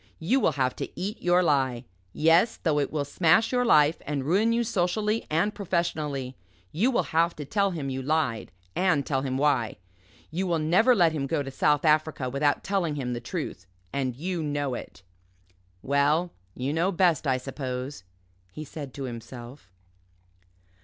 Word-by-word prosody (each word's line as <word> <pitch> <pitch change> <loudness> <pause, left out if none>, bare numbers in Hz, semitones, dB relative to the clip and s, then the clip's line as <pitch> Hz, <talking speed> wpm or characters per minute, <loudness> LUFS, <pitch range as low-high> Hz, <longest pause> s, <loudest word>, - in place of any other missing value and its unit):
You 215 +12 +1
will 160 - +2
have 130 -2 0
to - - -4
eat 200 +4 -4
your 175 +1 +3
lie. 130 -6 +1 0.3
Yes 165 - +3
though 155 -3 +1
it 140 - -1
will 145 -2 -1
smash 170 +9 +3
your 250 -1 +2
life 155 -8 +4
and 140 -2 -2
ruin 200 +9 +3
you 235 +1 +2
socially 210 +2 0
and 170 +7 +1
professionally. 155 -8 -2 0.4
You 205 - +2
will 255 - +1
have 170 +1 +2
to 150 - -6
tell 200 +7 +1
him 150 -7 -4
you 130 0 -3
lied 140 -5 -1 0.2
and 175 -7 +2
tell 135 -2 0
him 130 -1 -2
why. 135 -6 +1 0.5
You 185 +4 -2
will 170 -2 +1
never 180 +11 +4
let 175 -6 +4
him 145 -3 -2
go 145 +1 0
to 135 - -7
South 150 +2 +2
Africa 155 -4 +2
without 145 +2 +1
telling 180 -6 -1
him 125 -4 -3
the 120 - -4
truth 120 - -5 0.3
and 130 -3 -1
you 175 +5 -3
know 145 -3 -2
it." 110 - -8 0.8
"Well 145 +5 +2 0.2
you 130 +3 -2
know 170 +4 +1
best, 175 -4 +2
I 130 -1 +2
suppose," 130 -2 -5 0.5
he 155 - -7
said 140 -2 -8
to 140 - -5
himself. 120 -2 -9
150 Hz, 175 wpm, -27 LUFS, 135-175 Hz, 0.8 s, life